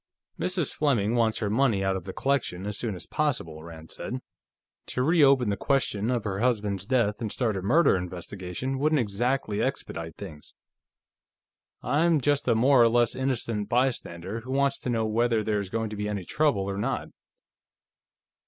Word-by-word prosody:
"Mrs. 180 Hz, -5 st, -1 dB
Fleming 120 Hz, -8 st, +1 dB
wants 115 Hz, -2 st, +2 dB
her 105 Hz, -, -1 dB
money 115 Hz, -4 st, +2 dB
out 95 Hz, 0 st, +1 dB
of 95 Hz, -2 st, -5 dB
the 95 Hz, -, -5 dB
collection, 135 Hz, -8 st, -1 dB
as 105 Hz, 0 st, -3 dB
soon 110 Hz, -2 st, -3 dB
as 90 Hz, -, -8 dB
possible," 85 Hz, -, -2 dB
Rand 80 Hz, -1 st, -11 dB
said. 125 Hz, -, -5 dB, 0.7 s
"To 125 Hz, -, -1 dB
reopen 140 Hz, -7 st, +4 dB
the -, -, 0 dB
question 115 Hz, -5 st, 0 dB
of 120 Hz, -3 st, 0 dB
her 100 Hz, -2 st, -3 dB
husband's 105 Hz, -5 st, 0 dB
death 115 Hz, -4 st, +1 dB
and 110 Hz, -3 st, -2 dB
start 115 Hz, -5 st, 0 dB
a 95 Hz, -, -3 dB
murder 155 Hz, -, +4 dB
investigation 90 Hz, +7 st, -4 dB
wouldn't 155 Hz, +2 st, +2 dB
exactly 120 Hz, -1 st, 0 dB
expedite 80 Hz, -1 st, -3 dB
things. 80 Hz, -7 st, -10 dB, 1.3 s
I'm 160 Hz, +2 st, +3 dB
just 145 Hz, +1 st, +1 dB
a -, -, +4 dB
more 130 Hz, +3 st, +5 dB
or 115 Hz, -, +6 dB
less 120 Hz, 0 st, +2 dB
innocent 120 Hz, -5 st, -2 dB
bystander, 115 Hz, -6 st, -1 dB
who 120 Hz, +3 st, -12 dB
wants 140 Hz, 0 st, +1 dB
to -, -, -4 dB
know 115 Hz, -2 st, +1 dB
whether 115 Hz, 0 st, +1 dB
there 105 Hz, -1 st, 0 dB
is 100 Hz, -2 st, -5 dB
going 110 Hz, +1 st, -2 dB
to -, -, -5 dB
be 105 Hz, 0 st, -3 dB
any 100 Hz, -3 st, -4 dB
trouble 135 Hz, -, +1 dB
or 100 Hz, 0 st, -3 dB
not.... -, -, -2 dB
115 Hz, 175 wpm, -27 LUFS, 100-130 Hz, 1.3 s, or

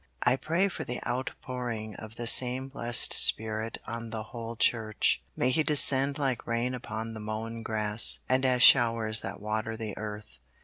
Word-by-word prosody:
I 125 Hz, +1 st, +3 dB
pray 165 Hz, +8 st, 0 dB
for 195 Hz, -, -6 dB
the 125 Hz, -, -5 dB
outpouring 120 Hz, -3 st, -5 dB
of 110 Hz, +1 st, -11 dB
the 120 Hz, -, -6 dB
same 130 Hz, +2 st, +2 dB
blessed 120 Hz, -3 st, +3 dB
Spirit 110 Hz, 0 st, +2 dB
on 115 Hz, 0 st, -7 dB
the 110 Hz, -1 st, -6 dB
whole 115 Hz, +1 st, -8 dB
Church. 110 Hz, -1 st, 0 dB
May 125 Hz, -, 0 dB
He 160 Hz, -, +2 dB
descend 140 Hz, -2 st, +4 dB
like 135 Hz, -5 st, -3 dB
rain 120 Hz, +2 st, -2 dB
upon 115 Hz, -2 st, -6 dB
the 110 Hz, -, -8 dB
mown 110 Hz, +2 st, -6 dB
grass, 110 Hz, 0 st, +4 dB
and 130 Hz, +1 st, +1 dB
as 125 Hz, -1 st, +2 dB
showers 115 Hz, -3 st, +4 dB
that 100 Hz, +1 st, -7 dB
water 110 Hz, +1 st, -4 dB
the 110 Hz, -2 st, -6 dB
earth. 105 Hz, -10 st, -9 dB
115 Hz, 170 wpm, -28 LUFS, 110-125 Hz, -, descend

